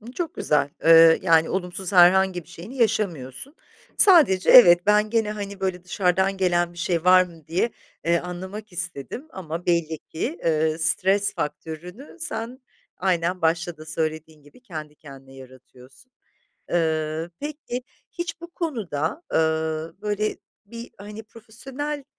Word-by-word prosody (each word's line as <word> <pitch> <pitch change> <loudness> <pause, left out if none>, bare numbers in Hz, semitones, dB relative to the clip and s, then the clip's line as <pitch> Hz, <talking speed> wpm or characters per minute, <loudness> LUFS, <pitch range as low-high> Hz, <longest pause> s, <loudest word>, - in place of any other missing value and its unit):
Imm, 225 +2 -11
çok 335 +2 -4
güzel. 145 -1 0
Iıı, 165 0 +7
yani, 165 -2 +3
olumsuz 185 0 -3
herhangi 185 0 +5
bir 155 - -25
şeyini 180 +9 -10
yaşamıyorsun. 200 - -2 0.4
Sadece 295 - +5
evet, 175 -7 +8
ben 210 +1 +3
gene, 225 -2 +1
hani, 200 -2 -7
böyle, 185 -2 -3
dışarıdan 190 +1 0
gelen 175 -2 +1
bir 175 - -14
şey 175 -1 -1
var 185 0 +7
mı 165 -4 -11
diye, 175 +8 0 0.3
eee, 170 0 +2
anlamak 190 +4 -8
istedim 180 - -5
ama 170 -2 -7
belli 165 -2 0
ki, 240 - -5
ııı, 160 0 +1
stres 190 +5 +1
faktörünü 175 - -7
sen, 245 -6 -4 0.4
aynen 180 -1 -1
başta 165 +1 0
da 155 - -12
söylediğin 155 -1 -4
gibi 145 - -20
kendi 155 -10 -8
kendine 135 -3 -14
yaratıyorsun. 130 - -16 0.6
Iıı, 160 -1 -1
peki 290 -4 -5 0.3
hiç 345 -1 -5
bu 340 +1 -10
konuda, 225 - -3
ııı, 160 0 -1
böyle, 210 0 -1 0.3
bir, 235 +3 -10
hani, 210 +2 -9
profesyonel, 270 +7 -7
180 Hz, 140 wpm, -23 LUFS, 160-215 Hz, 0.6 s, evet